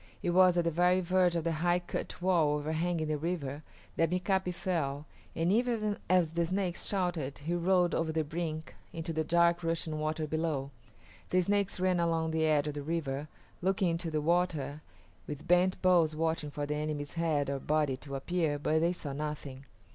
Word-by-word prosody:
It 175 - +1
was 180 0 +5
at 175 - +3
the 170 - +1
very 180 +3 +3
verge 180 -1 +2
of 165 -1 -1
a 170 - +1
high 175 +2 +2
cut 175 0 -5
wall 165 -5 +3
overhanging 160 +2 -1
the 155 -1 -1
river 150 -4 -3 0.4
that 165 -1 +3
Mika´pi 185 +1 0
fell, 155 -5 -2 0.3
and 165 +2 +1
even 220 -2 +1
as 180 -3 +3
the 170 0 +1
Snakes 180 0 -1
shouted 175 -8 -1
he 155 +4 -3
rolled 175 0 +2
over 165 -1 0
the 160 0 0
brink 155 0 -4 0.2
into 165 0 -4
the 160 0 0
dark 170 +1 +3
rushing 165 -2 -1
water 155 +1 -1
below. 155 -3 -2 0.6
The 185 - +3
Snakes 200 +1 0
ran 185 -1 +2
along 165 -1 +1
the 160 0 +1
edge 150 -1 +2
of 150 - -2
the 145 - -4
river, 145 -2 -3 0.3
looking 190 0 +1
into 165 0 -2
the 155 -1 -1
water, 160 -3 0 0.5
with 150 -1 -7
bent 180 +1 +3
bows 170 -4 +4
watching 160 -1 -1
for 145 0 -4
the 150 - -2
enemy's 150 -1 -3
head 160 -4 0
or 140 0 -2
body 150 -2 +1
to 140 0 -8
appear, 155 +1 0
but 155 +2 +1
they 170 +2 +2
saw 145 -5 -5
nothing. 140 -2 -5
165 Hz, 190 wpm, -31 LUFS, 150-180 Hz, 0.6 s, was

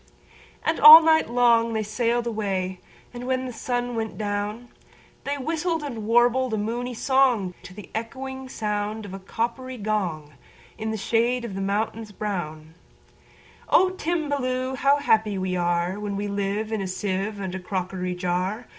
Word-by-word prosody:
And 320 - 0
all 310 +2 +12
night 315 -4 +3
long 235 -1 +3
they 220 -1 0
sail'd 235 +3 0
away; 195 -5 -2 0.3
And, 245 +1 -7
when 260 0 0
the 250 - -6
sun 245 +1 -2
went 220 -1 -3
down, 210 +3 -3 0.6
They 285 +1 -1
whistled 320 +3 -2
and 230 -7 -5
warbled 240 +1 +3
a - - -2
moony 240 +4 -3
songTo 230 -9 +1
the 210 - -11
echoing 265 +3 -5
sound 210 -2 -3
of 195 - -9
a 195 - -6
coppery 240 +6 -4
gong, 185 -9 -2 0.4
In 220 0 -4
the 220 - -2
shade 235 +4 +1
of 220 - -6
the 195 - -4
mountains 215 +2 -2
brown,"O 175 - -3
Timballoo! 285 -7 -2
how 280 +2 +3
happy 220 -8 +2
we 185 0 -2
areWhen 180 +4 -1
we 205 +1 -2
live 200 +2 -2
in 220 -2 -1
a 190 - -3
sieve 195 +2 -3
and 190 -2 -4
a 190 - -4
crockery 180 -1 -3
jar! 180 +6 -2
220 Hz, 155 wpm, -24 LUFS, 195-250 Hz, 0.6 s, all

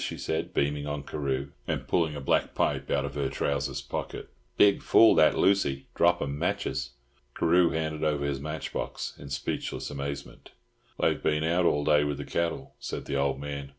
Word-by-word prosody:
she - - -4
said, 80 - -2
beaming 70 +1 0
on 75 -1 -3
Carew, 70 -1 -3 0.2
and - - -2
pulling 80 -3 +1
a - - -4
black 70 - +1
pipe - - 0
out 70 0 +1
of 70 - -5
her 70 -2 -1
trousers' 70 -2 -2
pocket. - - -5 0.3
"Big 100 -1 +5
fool 115 - +6
that 80 - +5
Lucy, 70 -9 +2
drop 85 0 +3
'em 70 0 -4
matches." 90 -9 -2 0.4
Carew 85 +1 +4
handed 80 -1 -2
over 75 -2 +1
his 70 -1 -1
match 75 +2 -5
box - - -4
in 70 - -9
speechless 70 +2 -3
amazement. 70 0 -6 0.5
"They've - - +2
been 75 0 +1
out 85 +2 +2
all 75 -3 +2
day 75 0 +4
with 75 -1 -2
the 70 - -6
cattle," 85 -5 -2
said - - -5
the 70 - -3
old 70 -1 0
man. 70 -1 -5
75 Hz, 185 wpm, -28 LUFS, 70-80 Hz, 0.5 s, fool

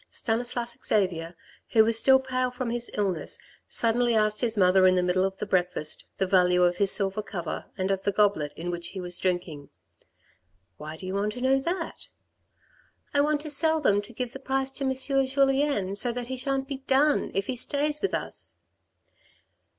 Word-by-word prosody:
Stanislas 240 +1 0
Xavier, 175 -5 -1 0.3
who 220 -1 +4
was 225 0 +5
still 265 +3 +5
pale 255 -1 -2
from 250 -1 -5
his 240 0 +1
illness, 195 -5 -2 0.3
suddenly 235 0 +1
asked 215 -1 +1
his 230 -3 +1
mother 185 0 +4
in 185 - +4
the 180 - +1
middle 180 +1 +1
of 195 0 -2
the 210 - -4
breakfast, 180 -5 -1
the 190 - 0
value 180 -1 +3
of 175 0 +2
his 200 0 +4
silver 195 +1 +3
cover 175 -6 -6
and 190 +1 -1
of 195 -1 -1
the 200 - 0
goblet 195 -8 +1
in 175 +2 -5
which 170 -1 -4
he 195 - -7
was 180 -1 -1
drinking. 175 -6 -3 0.5
" 90 +1 -40
Why 155 +1 -8
do 185 - -7
you 185 - -5
want 205 +2 -1
to 245 - -8
know 265 +1 +2
that? 335 +4 -5 0.3
" - - -40
" - - -36
I 285 - +3
want 295 0 0
to 305 0 0
sell 315 +2 +3
them 205 -9 +2
to 205 - -9
give 245 +1 -5
the 270 - -8
price 270 0 -2
to 275 +1 -2
M. 265 0 0 0.3
Julien 270 -7 +1
so 240 +4 +2
that 245 0 -5
he 260 +2 -5
shan't 270 +1 -2
be 275 -1 -5
done 275 +2 +1
if 195 +1 0
he 255 - -4
stays 290 +4 0
with 395 - -1
us." - - -7
215 Hz, 205 wpm, -26 LUFS, 185-265 Hz, 0.5 s, was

